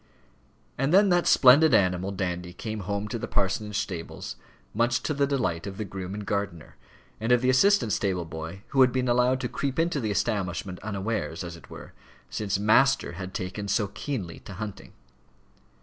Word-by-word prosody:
And 135 Hz, +3 st, +1 dB
then 195 Hz, +2 st, +6 dB
that 175 Hz, -1 st, +3 dB
splendid 145 Hz, +3 st, +7 dB
animal, 90 Hz, 0 st, +2 dB
Dandy, 90 Hz, -2 st, -3 dB
came 110 Hz, +3 st, -5 dB
home 100 Hz, +2 st, -3 dB
to 115 Hz, -, -3 dB
the -, -, -4 dB
parsonage 100 Hz, +2 st, -1 dB
stables, 85 Hz, -4 st, -5 dB, 0.4 s
much 115 Hz, +2 st, +1 dB
to 150 Hz, -, -1 dB
the 140 Hz, -1 st, +1 dB
delight 115 Hz, -11 st, -1 dB
of 95 Hz, -1 st, -7 dB
the 110 Hz, -, -3 dB
groom 95 Hz, 0 st, -6 dB
and 105 Hz, -1 st, -6 dB
gardener, 100 Hz, -5 st, -3 dB, 0.4 s
and 115 Hz, +2 st, -1 dB
of 125 Hz, -1 st, +5 dB
the 130 Hz, -, +4 dB
assistant 130 Hz, -, +4 dB
stable 95 Hz, -4 st, -1 dB
boy 80 Hz, +4 st, -7 dB
who 135 Hz, -, +3 dB
had 125 Hz, -1 st, +6 dB
been 130 Hz, 0 st, 0 dB
allowed 125 Hz, +2 st, +3 dB
to 125 Hz, -, -1 dB
creep 135 Hz, +1 st, -3 dB
into 165 Hz, -2 st, +1 dB
the 110 Hz, -4 st, -2 dB
establishment, 95 Hz, -4 st, -2 dB
unawares 100 Hz, -6 st, -3 dB
as 85 Hz, -1 st, -7 dB
it 85 Hz, -, -15 dB
were, -, -, -11 dB, 0.4 s
since 105 Hz, -2 st, -1 dB
"master" 135 Hz, +7 st, +3 dB
had 95 Hz, +2 st, -7 dB
taken 95 Hz, +3 st, -4 dB
so 100 Hz, 0 st, +1 dB
keenly 100 Hz, -, -5 dB
to 100 Hz, -, -10 dB
hunting. 100 Hz, -1 st, -7 dB
105 Hz, 180 wpm, -27 LUFS, 95-125 Hz, 0.4 s, splendid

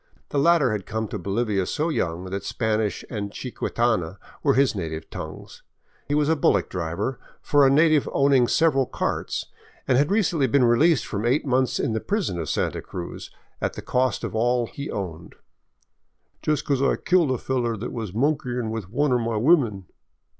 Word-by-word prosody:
The 145 Hz, -, 0 dB
latter 160 Hz, -4 st, +4 dB
had 105 Hz, -3 st, -3 dB
come 110 Hz, 0 st, -2 dB
to 105 Hz, -, -4 dB
Bolivia 100 Hz, 0 st, -1 dB
so 155 Hz, +3 st, -1 dB
young 90 Hz, -, -2 dB
that 100 Hz, 0 st, -3 dB
Spanish 110 Hz, -3 st, -1 dB
and 105 Hz, -4 st, -4 dB
chiquitana 110 Hz, -7 st, -1 dB, 0.2 s
were -, -, +3 dB
his 135 Hz, 0 st, +3 dB
native 80 Hz, -5 st, -5 dB
tongues. -, -, -8 dB, 0.5 s
He 145 Hz, -, 0 dB
was 150 Hz, -1 st, +2 dB
a 160 Hz, -, +3 dB
bullock 100 Hz, -, +2 dB
driver 90 Hz, +8 st, -3 dB, 0.2 s
for 145 Hz, -2 st, +4 dB
a -, -, +5 dB
native 155 Hz, +1 st, +4 dB
owning 135 Hz, -3 st, +4 dB
several 135 Hz, -5 st, +2 dB
carts, -, -, -2 dB, 0.4 s
and 130 Hz, 0 st, +4 dB
had 145 Hz, -, +2 dB
recently 175 Hz, -9 st, +2 dB
been 135 Hz, +2 st, +3 dB
released 135 Hz, +4 st, +4 dB
from 100 Hz, +1 st, -4 dB
eight 130 Hz, +7 st, +1 dB
months 130 Hz, -1 st, +1 dB
in 115 Hz, -, 0 dB
the 110 Hz, -, -1 dB
prison 195 Hz, -, -1 dB
of 80 Hz, -, -4 dB
Santa -, -, -1 dB
Cruz, 90 Hz, -1 st, -7 dB, 0.3 s
at -, -, -1 dB
the -, -, -8 dB
cost 125 Hz, -3 st, 0 dB
of -, -, -4 dB
all 120 Hz, +2 st, +1 dB
he 140 Hz, +5 st, -7 dB
owned, 85 Hz, -4 st, -6 dB, 0.6 s
— -, -, -47 dB
"Jes* 150 Hz, -1 st, 0 dB
becoze 140 Hz, -2 st, 0 dB
I 140 Hz, -, +3 dB
killed 180 Hz, -5 st, +2 dB
a 130 Hz, -, +1 dB
feller 120 Hz, -3 st, -1 dB
thet 115 Hz, -, -5 dB
was 110 Hz, -5 st, -4 dB
monkeyin' 125 Hz, -1 st, -1 dB
with 110 Hz, -5 st, -5 dB
one 140 Hz, +4 st, +1 dB
o' 125 Hz, -, +3 dB
my 115 Hz, -1 st, -1 dB
women." 115 Hz, -, +3 dB
120 Hz, 185 wpm, -24 LUFS, 105-140 Hz, 0.6 s, a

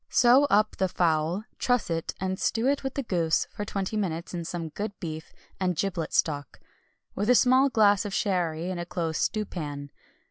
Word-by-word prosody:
Sew 250 Hz, +4 st, +5 dB
up 215 Hz, -5 st, +2 dB
the 190 Hz, -, +2 dB
fowl, 165 Hz, +3 st, +1 dB, 0.2 s
truss 245 Hz, -8 st, +1 dB
it, 165 Hz, -1 st, -2 dB
and 190 Hz, 0 st, -2 dB
stew 225 Hz, +1 st, 0 dB
it 280 Hz, +1 st, +1 dB
with 270 Hz, 0 st, -4 dB
the 275 Hz, -, -1 dB
goose 170 Hz, -7 st, +1 dB
for 205 Hz, -, -5 dB
twenty 200 Hz, 0 st, -3 dB
minutes 170 Hz, -6 st, -3 dB
in 170 Hz, -1 st, -3 dB
some 165 Hz, -1 st, -4 dB
good 205 Hz, +5 st, -5 dB
beef 160 Hz, -1 st, -6 dB, 0.3 s
and 180 Hz, -2 st, 0 dB
giblet 175 Hz, -2 st, -2 dB
stock, 145 Hz, -4 st, -1 dB, 0.5 s
with 205 Hz, +3 st, -2 dB
a 250 Hz, -, +6 dB
small 260 Hz, +3 st, +5 dB
glass 205 Hz, -4 st, +4 dB
of 205 Hz, -, -5 dB
sherry, 175 Hz, -4 st, -1 dB
in 180 Hz, -, -4 dB
a 175 Hz, -, -3 dB
close 165 Hz, -3 st, -2 dB
stewpan. 150 Hz, -9 st, -3 dB
185 Hz, 185 wpm, -27 LUFS, 165-215 Hz, 0.5 s, a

